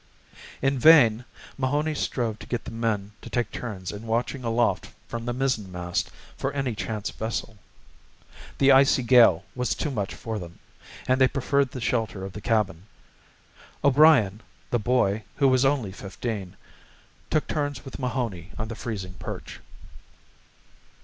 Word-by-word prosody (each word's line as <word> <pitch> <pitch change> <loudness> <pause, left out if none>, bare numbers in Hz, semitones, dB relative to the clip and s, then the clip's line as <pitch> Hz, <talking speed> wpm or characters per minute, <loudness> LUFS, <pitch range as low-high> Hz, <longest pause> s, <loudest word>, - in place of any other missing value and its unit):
In 135 -1 +2
vain 125 -6 +6 0.3
Mahoney 145 +4 0
strove 115 -6 -2
to - - -10
get 120 -2 -3
the - - -6
men 110 -3 -2
to - - -9
take 120 -1 -1
turns 100 -7 -5
in 105 +2 -8
watching 120 +3 -1
aloft 115 0 +1 0.2
from 115 0 -5
the 120 - -1
mizzenmast 100 -9 -2 0.3
for 135 - -2
any 135 -4 -1
chance 110 -1 -4
vessel. 110 -1 -4 1.0
The 135 0 +5
icy 135 -1 +5
gale 115 -7 +6
was 125 0 -1
too 150 - -2
much 105 -6 -3
for 110 -2 -4
them, 85 -2 -9 0.5
and 130 +1 +2
they 130 - +7
preferred 140 0 +1
the 130 - -7
shelter 110 -5 -1
of 95 - -8
the 105 - -7
cabin. 105 -5 0 1.0
O'Brien, 140 -8 +5 0.3
the 120 - +2
boy, 110 -2 +1
who 140 - +3
was 130 0 +4
only 135 -8 +1
fifteen, 100 0 -6 0.7
took 155 - +1
turns 145 -3 -2
with 135 - -8
Mahoney 120 -9 -3
on 110 0 -4
the 115 - -5
freezing 100 -6 -5
perch. - - -7
115 Hz, 150 wpm, -26 LUFS, 105-130 Hz, 1.0 s, they